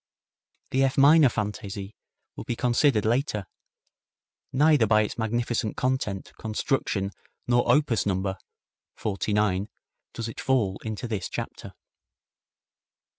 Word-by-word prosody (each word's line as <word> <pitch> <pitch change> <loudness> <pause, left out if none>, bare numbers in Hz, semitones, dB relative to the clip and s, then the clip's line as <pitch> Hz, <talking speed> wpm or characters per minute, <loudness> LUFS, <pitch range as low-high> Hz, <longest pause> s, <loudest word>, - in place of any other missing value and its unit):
The 135 +1 +3
F 135 -1 +1
minor 145 +1 +7
Fantaisie 105 -2 -4 0.4
will - - -6
be 120 - -3
considered 120 -2 +2
later. 115 -3 0 1.1
Neither 145 -3 +4
by 110 0 +4
its 105 - -4
magnificent 115 -1 -1
content, 125 -7 -2
construction 110 -3 -1 0.3
nor 120 0 +3
opus 135 -9 +2
number 95 0 -1 0.6
(49) 105 -1 0 0.4
does 115 - -4
it 115 - -7
fall 115 -8 +1
into 110 +2 -4
this 110 -5 -3
chapter. - - -6
110 Hz, 110 wpm, -26 LUFS, 105-130 Hz, 1.1 s, minor